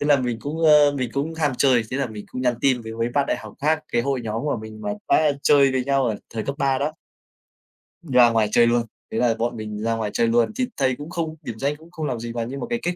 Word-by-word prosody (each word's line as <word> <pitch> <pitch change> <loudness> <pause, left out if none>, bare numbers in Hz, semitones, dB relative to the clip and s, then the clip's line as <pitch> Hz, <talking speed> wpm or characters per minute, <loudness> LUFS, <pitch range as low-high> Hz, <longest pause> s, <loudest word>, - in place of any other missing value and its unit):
thế 145 - -1
là 145 -1 +6
mình 120 -2 -2
cũng, 160 +3 -3
ơ, 150 -2 +6
mình 130 -4 -3
cũng 150 +4 -2
ham 150 -4 0
chơi, 130 -4 +4
thế 130 - -2
là 140 -2 0
mình 105 -2 -8
cũng 130 - -5
nhắn 125 -1 +2
tin 130 -3 +2
với 110 0 -7
mấy 115 +1 -1
bạn 140 -1 +2
đại - - 0
học - - -10
khác, 155 +2 +1
cái 120 0 +2
hội 135 -2 -1
nhóm 110 +2 -3
của 145 -4 -1
mình 110 0 -10
mà 105 - -3 0.2
đã 155 -2 +4
chơi 140 -2 +5
với 130 -1 0
nhau 135 -1 +2
ở 110 - -1
thời 110 -1 -3
cấp 140 - -3
3 135 -1 +1
đó. 150 +2 -2 1.1
Đi 145 -7 -6
ra 120 -1 +8
ngoài 110 -2 +2
chơi 120 0 +5
luôn, 120 0 +2 0.3
thế 110 - -3
là 120 -2 +2
bọn 120 +1 -1
mình 105 -1 -5
ra 115 0 +1
ngoài 110 -2 -3
chơi 115 - +2
luôn. 115 0 +2
Thì 255 -1 0
thầy 130 -2 +1
cũng 145 +4 -9
không 165 -2 -3
điểm 115 -7 -7
danh 140 +2 0
cũng 160 +3 -17
không 160 -3 -5
làm 125 -5 -2
gì, 115 0 -5
và 115 -1 -2
nhưng 135 +4 -6
mà - - -3
cái 235 - -1
kết 175 0 -2
130 Hz, 295 wpm, -23 LUFS, 115-145 Hz, 1.1 s, ra